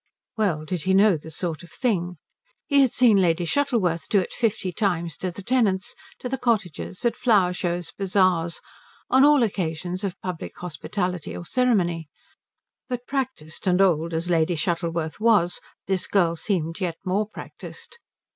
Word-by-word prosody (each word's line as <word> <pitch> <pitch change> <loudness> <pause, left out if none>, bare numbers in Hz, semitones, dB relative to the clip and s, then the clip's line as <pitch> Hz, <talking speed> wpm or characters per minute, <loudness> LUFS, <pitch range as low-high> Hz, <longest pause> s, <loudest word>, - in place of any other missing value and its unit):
Well 180 -9 0
did 175 +1 -2
he 190 +4 +2
know 200 -1 +6
the 160 +1 -8
sort 160 0 -4
of 175 - -13
thing. 180 -6 -1 0.5
He 280 -2 +4
had 260 -4 +4
seen 240 -5 +5
Lady 175 -2 +2
Shuttleworth 190 - 0
do 205 - +4
it 185 - -3
fifty 215 -5 0
times 175 -5 -1
to 185 - -2
the 185 +3 -9
tenants, 205 -5 +1 0.3
to - - -3
the 265 +1 -3
cottagers, 215 -5 -1
at 235 -1 +2
flower 205 -8 +3
shows, 175 -2 -2
bazaars, 185 -4 +1 0.5
on 265 +1 +6
all 290 -3 +6
occasions 180 -3 -2
of 200 -1 -3
public 180 -3 -6
hospitality 180 0 -3
or 175 - -7
ceremony; 175 - +1 0.8
but 245 -1 -3
practised 255 - -4
and 180 0 +3
old 170 -3 +2
as 165 +2 -1
Lady 170 0 +2
Shuttleworth 165 0 -2
was 210 -6 +3 0.3
this 190 -1 0
girl 175 -4 +2
seemed 165 -1 -2
yet 170 -3 -1
more 200 +3 0
practised. 475 - -9
185 Hz, 160 wpm, -24 LUFS, 170-215 Hz, 0.8 s, know